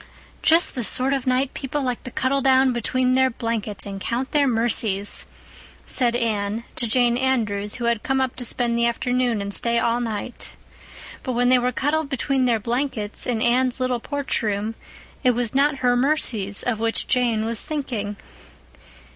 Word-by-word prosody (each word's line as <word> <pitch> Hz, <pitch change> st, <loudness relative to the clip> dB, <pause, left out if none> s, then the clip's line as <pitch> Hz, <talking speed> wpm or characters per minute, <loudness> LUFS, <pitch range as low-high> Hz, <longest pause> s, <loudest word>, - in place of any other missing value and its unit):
"Just 330 Hz, +2 st, +4 dB
the 250 Hz, -, -3 dB
sort 260 Hz, +4 st, +3 dB
of 270 Hz, -2 st, -2 dB
night 255 Hz, +2 st, +1 dB
people 280 Hz, +1 st, -3 dB
like 250 Hz, -2 st, -2 dB
to -, -, -4 dB
cuddle 265 Hz, +3 st, 0 dB
down 265 Hz, -1 st, +4 dB
between 255 Hz, +2 st, 0 dB
their 260 Hz, 0 st, +4 dB
blankets 230 Hz, -4 st, -2 dB
and 195 Hz, -1 st, -7 dB
count 245 Hz, +5 st, -2 dB
their 290 Hz, -2 st, +3 dB
mercies," 225 Hz, -4 st, -1 dB, 0.6 s
said 240 Hz, -3 st, +4 dB
Anne 220 Hz, -2 st, -1 dB
to 240 Hz, -, +3 dB
Jane 240 Hz, +1 st, +3 dB
Andrews, 215 Hz, -6 st, 0 dB
who 240 Hz, -, -4 dB
had 235 Hz, -2 st, +1 dB
come 270 Hz, -2 st, 0 dB
up 260 Hz, -1 st, -1 dB
to 250 Hz, -, -5 dB
spend 235 Hz, 0 st, 0 dB
the 235 Hz, 0 st, +2 dB
afternoon 245 Hz, -2 st, 0 dB
and 200 Hz, 0 st, -4 dB
stay 235 Hz, +2 st, +1 dB
all 235 Hz, +1 st, +1 dB
night. 225 Hz, +1 st, -5 dB, 0.7 s
But 255 Hz, -, -3 dB
when 245 Hz, +1 st, +2 dB
they 255 Hz, 0 st, +5 dB
were 250 Hz, +1 st, 0 dB
cuddled 295 Hz, +3 st, -1 dB
between 270 Hz, -1 st, 0 dB
their 235 Hz, -3 st, +2 dB
blankets, 235 Hz, -2 st, -3 dB
in 230 Hz, -3 st, 0 dB
Anne's 255 Hz, +2 st, +2 dB
little 255 Hz, -1 st, 0 dB
porch 285 Hz, +3 st, -2 dB
room, 210 Hz, 0 st, -2 dB, 0.5 s
it 250 Hz, -2 st, +3 dB
was 240 Hz, -1 st, -1 dB
not 280 Hz, +1 st, +2 dB
her 245 Hz, 0 st, +4 dB
mercies 245 Hz, -7 st, 0 dB
of 230 Hz, -3 st, -1 dB
which 225 Hz, 0 st, 0 dB
Jane 235 Hz, -3 st, +1 dB
was 230 Hz, 0 st, -1 dB
thinking. 240 Hz, -10 st, -4 dB
245 Hz, 180 wpm, -22 LUFS, 225-260 Hz, 0.7 s, they